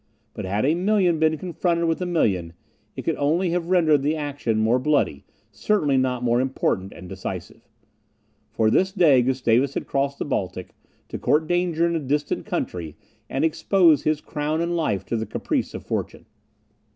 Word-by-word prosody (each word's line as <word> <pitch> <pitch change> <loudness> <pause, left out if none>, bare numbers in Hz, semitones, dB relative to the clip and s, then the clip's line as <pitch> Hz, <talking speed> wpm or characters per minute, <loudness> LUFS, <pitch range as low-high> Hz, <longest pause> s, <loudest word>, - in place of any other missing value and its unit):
But - - -6
had 100 +5 0
a 150 - +3
million 180 -2 +2
been 160 0 +2
confronted 170 0 -1
with 165 +2 0
a 180 - -1
million 95 - 0 0.4
it - - -6
could - - -1
only 165 +5 +1
have 175 0 -2
rendered 160 -6 +4
the 150 +3 0
action 145 -7 -2
more 110 +3 +2
bloody, 130 - 0 0.3
certainly 155 -10 +1
not 130 -1 0
more 120 0 +2
important 100 -7 -1
and 90 - -11
decisive. - - -7 0.8
For 110 -1 +1
this 190 +8 +2
day 160 -10 +5
Gustavus 130 +1 +1
had - - -3
crossed 140 0 -1
the - - -3
Baltic, 95 -9 -3 0.4
to - - -5
court 155 +2 +2
danger 175 -1 +1
in 170 0 0
a - - 0
distant 145 +1 -2
country, 80 -4 -4 0.3
and 135 +4 0
expose 165 -1 +3
his 155 -1 0
crown 150 +1 -2
and 170 +1 -1
life 155 - -1
to - - -2
the 110 0 -2
caprice - - -2
of - - -8
fortune. - - -4
145 Hz, 175 wpm, -23 LUFS, 125-170 Hz, 0.8 s, day